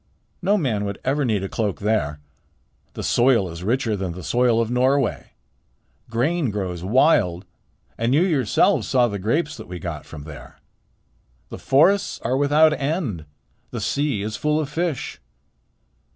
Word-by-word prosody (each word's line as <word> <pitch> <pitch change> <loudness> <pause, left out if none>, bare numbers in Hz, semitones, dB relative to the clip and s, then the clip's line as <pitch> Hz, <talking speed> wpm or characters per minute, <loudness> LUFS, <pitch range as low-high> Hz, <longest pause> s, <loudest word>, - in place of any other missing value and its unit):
"No 200 +3 +2
man 120 - -1
would 100 -1 -4
ever 140 +3 +1
need 110 -6 0
a - - -2
cloak 105 -1 -2
there. 90 -9 0 0.7
The - - -6
soil 120 -7 +3
is 85 +2 -8
richer 115 +1 0
than 95 -3 -3
the 90 +1 -9
soil 120 +7 +2
of 115 0 0
Norway. 130 0 +1 0.8
Grain 140 +6 0
grows 95 -4 -4
wild, 100 - +3 0.5
and 115 +2 +1
you 160 - +4
yourselves 145 - +2
saw 125 -2 +3
the 100 -3 -4
grapes 150 - -1
that 110 - -10
we 90 +1 -6
got 85 -5 -6
from 75 -3 -9
there. 75 -1 -11 0.9
The - - -8
forests 180 +9 +3
are 125 +3 0
without 150 +3 +4
end. 140 - -2 0.4
The - - -5
sea 140 -8 -1
is 110 +1 -4
full 150 +4 0
of 150 -3 -3
fish." 165 -3 -3
120 Hz, 155 wpm, -22 LUFS, 100-145 Hz, 0.9 s, you